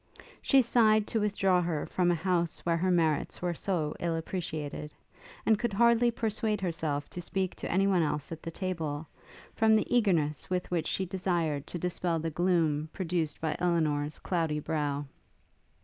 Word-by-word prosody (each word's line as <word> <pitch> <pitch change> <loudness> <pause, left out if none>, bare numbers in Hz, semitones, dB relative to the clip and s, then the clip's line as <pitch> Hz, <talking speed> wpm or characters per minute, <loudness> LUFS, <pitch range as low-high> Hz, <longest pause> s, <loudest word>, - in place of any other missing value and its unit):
She 270 -2 +5
sighed 220 -3 +4
to 225 - 0
withdraw 195 -3 +2
her 165 -4 -1
from 180 -1 +1
a 175 - +3
house 170 -1 0
where 170 -1 +2
her 185 +3 +1
merits 160 -4 +1
were 175 -1 -1
so 165 -4 -2
ill 170 -1 -1
appreciated; 155 -3 -4 0.5
and 220 -2 +4
could 235 -4 -1
hardly 235 +2 +4
persuade 220 -2 -1
herself 160 -5 -2
to 175 - -6
speak 190 +1 -2
to - - -4
any 190 +2 +3
one 190 -3 +3
else 150 -1 -2
at 160 -1 -6
the - - -5
table, 160 -4 -3 0.5
from 220 0 +4
the 215 - +2
eagerness 165 - +1
with 180 -1 -2
which 170 -3 0
she 190 - -1
desired 170 -6 -1
to - - -5
dispel 175 -1 -1
the 165 0 -2
gloom 160 -3 +1
produced 170 -5 -2
by 160 -1 -1
Elinor's 155 -4 0
cloudy 165 -4 -1
brow. 145 -2 -2
175 Hz, 170 wpm, -30 LUFS, 155-190 Hz, 0.5 s, She